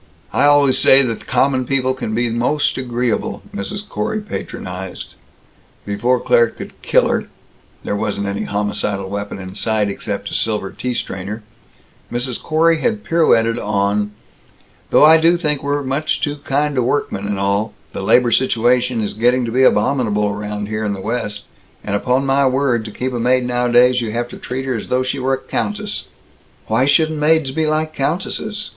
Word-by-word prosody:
"I - - +3
always 145 -2 +4
say 135 +1 +7
that 115 -3 -4
common 130 +1 +2
people 130 0 0
can 110 -4 -4
be 120 0 0
most 125 +6 +1
agreeable," 125 -2 -2
Mrs. 200 - -4
Corey 220 +1 -2
patronized. 95 - -7 0.7
Before 120 +5 +1
Claire 120 -1 +4
could - - -10
kill - - +3
her - - -1 0.6
there - - -2
wasn't 100 -1 -2
any 100 0 -3
homicidal 100 -1 -2
weapon 100 0 -4
in 95 -1 -8
sight 110 0 0
except 100 - -5
a - - -7
silver 105 -3 -1
tea 125 -1 -4
strainer 100 +3 -4 0.7
Mrs. 125 0 -2
Corey 165 +1 +2
had 220 +1 -1
pirouetted 115 -9 +2
on, 105 0 0 0.8
"Though - - +6
I 160 +1 +8
do 165 +2 +4
think 150 -4 0
that - - -9
we're 145 0 0
much 140 +4 -1
too 145 0 -2
kind 145 +1 -1
to 130 - +1
workmen 120 -6 -1
and 100 -1 -2
all 100 +2 -1 0.2
the - - -5
labor 120 +5 +3
situation 120 -1 +2
is 105 - -2
getting 125 +3 +2
to 115 - -4
be 130 +3 +2
abominable 105 -7 +2 0.3
here 110 +1 -3
in 105 -1 -1
the 100 - -6
West, 105 -1 -3 0.4
and 100 - -2
upon 125 +6 +1
my 135 0 +3
word, 130 -3 +1
to 105 - -6
keep 130 +4 -3
a 120 - -2
maid 125 +1 +2
nowadays, 125 0 +3
you 115 - -3
have 120 +1 -2
to - - -9
treat 130 +2 -5
her 130 - -1
as 115 - -4
though 130 0 +1
she 130 +2 -2
were 130 +1 0
a - - -7
countess." 210 +8 -3 0.6
"Why 125 +5 +1
shouldn't 155 +1 +3
maids 155 -2 +2
be 155 +2 0
like 155 0 0
countesses? 205 +8 -2
125 Hz, 180 wpm, -18 LUFS, 105-140 Hz, 0.8 s, I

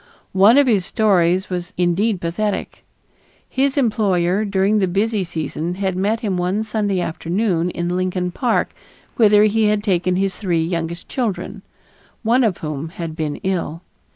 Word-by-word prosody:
One 200 +7 +6
of 285 - +6
his 215 -7 +2
stories 185 -2 +2
was 180 +1 -4
indeed 180 +4 +1
pathetic. 200 +5 -3 0.6
His 270 +2 0
employer, 205 -6 +1
during 200 +1 +2
the 190 - +2
busy 200 +3 0
season, 165 0 -4
had 190 -1 -2
met 210 +5 0
him 200 -6 -1
one 185 +4 0
Sunday 210 -3 -1
afternoon 175 +1 -1
in 175 0 -2
Lincoln 185 -1 -1
Park 240 +5 0 0.4
whither 210 -2 +6
he 215 +1 +3
had 210 0 +1
taken 185 -3 +1
his 195 +1 0
three 175 -5 0
youngest 170 0 -3
children, 230 -7 -3 0.6
one 240 +3 +3
of 210 -6 +1
whom 150 +1 -4
had 165 -2 -6
been 155 -3 -2
ill. 175 -3 -2
190 Hz, 155 wpm, -20 LUFS, 175-215 Hz, 0.6 s, One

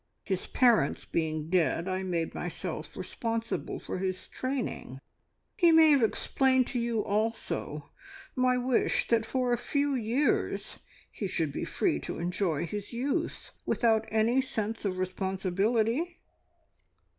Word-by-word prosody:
His 190 -2 -2
parents 235 - +3
being 155 -1 -2
dead, 175 -1 +2
I 185 0 -1
made 175 -3 -2
myself 170 -2 -5
responsible 230 +4 -3
for - - -5
his 185 -1 -3
training. 255 - -4 0.6
He 345 -3 +5
may 320 -1 +7
have 280 -3 +5
explained 260 +3 +2
to 250 - -1
you 235 -2 0
also 210 -8 -2 0.4
my 255 -1 +3
wish 250 0 +1
that 225 -1 +2
for 250 -2 +1
a 240 - 0
few 285 0 0
years 250 +4 0 0.3
he 200 - -4
should 160 -5 -1
be - - -3
free 75 - 0
to - - -5
enjoy 170 -2 -1
his 205 +5 -6
youth 280 +8 -2
without 225 -2 +2
any 225 +4 +3
sense 220 -4 -3
of 185 -2 -1
responsibility?" 200 - 0
220 Hz, 135 wpm, -29 LUFS, 185-250 Hz, 0.6 s, may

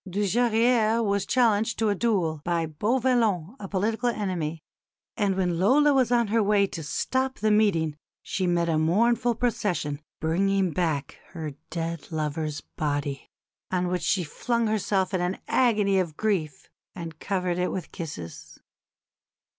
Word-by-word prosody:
Dujarrier 225 +3 +2
was 200 -2 0
challenged 225 -3 +2
to 220 -1 +1
a - - +3
duel 185 -8 0
by 170 -1 0
Beauvallon, 220 - +1
a 195 - -6
political 220 +5 0
enemy; 170 -8 -3 0.5
and 200 -4 +1
when 180 -3 0
Lola 285 +10 +5
was 255 -3 +2
on 235 -3 +3
her 225 +1 +3
way 205 -1 +3
to 175 -4 -6
stop 260 - -1
the 215 +1 +1
meeting 175 -8 +2 0.3
she 185 -2 -2
met 170 -1 +1
a 160 -2 +2
mournful 230 +8 +2
procession 200 -11 -1 0.2
bringing 190 +3 +1
back 160 -5 -2
her 160 -4 -5 0.2
dead 165 -2 -4
lover's 155 -1 -2
body, 145 -2 -3 0.4
on 180 -1 0
which 180 -1 -1
she 185 - +1
flung 235 +9 -1
herself 200 -3 0
in 185 - +1
an 180 +2 -1
agony 210 -6 +3
of 170 -5 -2
grief 190 -9 -1 0.3
and 165 -3 -7
covered 180 -2 -1
it 180 - 0
with 185 -4 -5
kisses. 90 - -8
190 Hz, 145 wpm, -26 LUFS, 165-220 Hz, 0.5 s, Lola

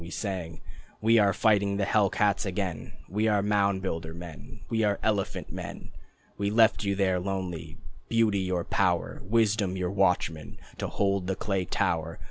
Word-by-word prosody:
We 85 - -8
sang: 90 -5 -4 0.4
"We 115 +1 +4
are 100 -1 +4
fighting 100 -1 +2
the 100 - +1
hell 100 -1 +3
cats 100 0 +1
again, 95 -4 -3
We 105 +5 0
are 105 -2 +2
mound 100 -2 +1
builder 80 -3 -3
men, 85 -6 -10
We 115 -1 0
are 100 -2 +2
elephant 105 -3 -1
men." - - -7 0.5
We 100 0 +1
left 110 0 +4
you 100 -1 0
there, 95 -2 +1
lonely, 90 -4 -4 0.3
Beauty 115 -3 +3
your 90 -2 -1
power, - - 0
Wisdom 105 -3 +1
your 90 0 -1
watchman, 90 -5 0 0.2
To - - -2
hold 100 -2 0
the 95 - 0
clay 95 -2 -1
tower. 80 -1 -1
100 Hz, 165 wpm, -28 LUFS, 90-105 Hz, 0.5 s, We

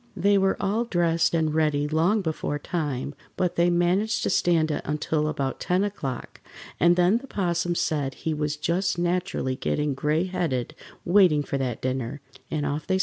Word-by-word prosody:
They 200 +3 +3
were 195 0 +2
all 215 +5 0
dressed 170 -5 +1
and 160 -2 +1
ready 150 -2 +1
long 170 +7 +2
before 155 -3 -2
time, 145 -4 -3 0.2
but 180 -2 0
they 170 +1 +3
managed 180 +5 +1
to - - +1
stand 165 -3 +2
it - - -2
until 150 +1 -1
about 140 -3 -2
ten 180 +2 +1
o'clock, 140 -11 -5 0.4
and 175 +2 +5
then 180 +6 +3
the 275 - -12
'Possum 175 -5 -1
said 145 -5 -1
he 160 - -3
was 150 0 -2
just 175 +5 0
naturally 175 -6 -1
getting 150 +2 -1
gray 150 +5 0
headed 175 -10 -2 0.3
waiting 175 -5 +5
for 140 - -3
that 125 -3 -3
dinner, 130 +1 -2 0.3
and 150 -2 -2
off 145 +2 -3
they 190 - +2
started. - - -2
165 Hz, 180 wpm, -25 LUFS, 145-180 Hz, 0.4 s, and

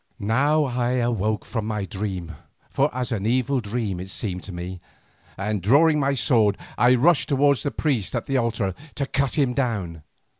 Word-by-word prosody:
Now 140 +9 +2
I 125 -2 -1
awoke 110 -4 0
from 110 -4 -3
my 105 -3 -2
dream, 95 -3 -4 0.4
for - - +2
as 125 +1 -3
an 105 -2 -1
evil 130 +2 +1
dream 105 -3 -3
it 95 +1 -7
seemed 95 -3 -4
to 100 - -7
me, 90 +1 -6 0.6
and 105 0 -2
drawing 150 - +4
my 140 0 +1
sword 115 -6 +3 0.2
I 120 +3 +5
rushed 150 +5 +3
towards 140 -1 +3
the 145 - -1
priest 130 - -1
at - - -2
the 135 - 0
altar 115 -5 0 0.2
to 140 - -1
cut 135 -1 -1
him 135 -4 +2
down. 100 - -2
115 Hz, 180 wpm, -24 LUFS, 100-135 Hz, 0.6 s, I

